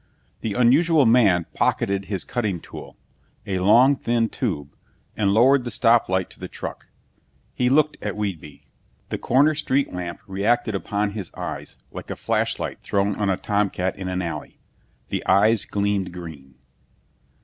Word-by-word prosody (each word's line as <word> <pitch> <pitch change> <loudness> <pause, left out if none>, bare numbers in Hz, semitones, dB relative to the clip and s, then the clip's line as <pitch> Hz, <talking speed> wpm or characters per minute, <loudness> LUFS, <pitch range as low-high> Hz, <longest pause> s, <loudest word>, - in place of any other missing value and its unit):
The 105 -3 -3
unusual 145 +5 +4
man 105 -8 +4
pocketed 100 0 0
his 95 -2 -3
cutting 105 -8 -2
tool - - -11 0.5
a 95 -3 -2
long 120 +9 +5
thin 115 -3 0
tube 75 - -4 0.4
and 100 -2 +1
lowered 125 +5 +5
the 120 - -4
stop 115 0 +3
light 95 -1 0
to - - -16
the - - -6
truck. - - -8 0.7
He 125 0 +1
looked 150 +3 +3
at 105 -1 -3
Whedbee. 85 -9 -5 0.5
The - - -3
corner 140 +5 +3
street 140 -4 0
lamp 90 -1 -5
reacted 105 +3 0
upon 100 +1 -1
his 100 -4 -6
eyes - - -6
like - - -9
a - - -3
flashlight - - -2
thrown 100 0 0
on 105 -2 0
a 95 - +1
tomcat 100 -3 -1
in 95 -2 -6
an 90 0 -2
alley. 85 - -6 0.5
The - - -2
eyes 105 +3 +4
gleamed 100 -2 -1
green. 80 -7 -10
105 Hz, 155 wpm, -23 LUFS, 95-120 Hz, 0.7 s, long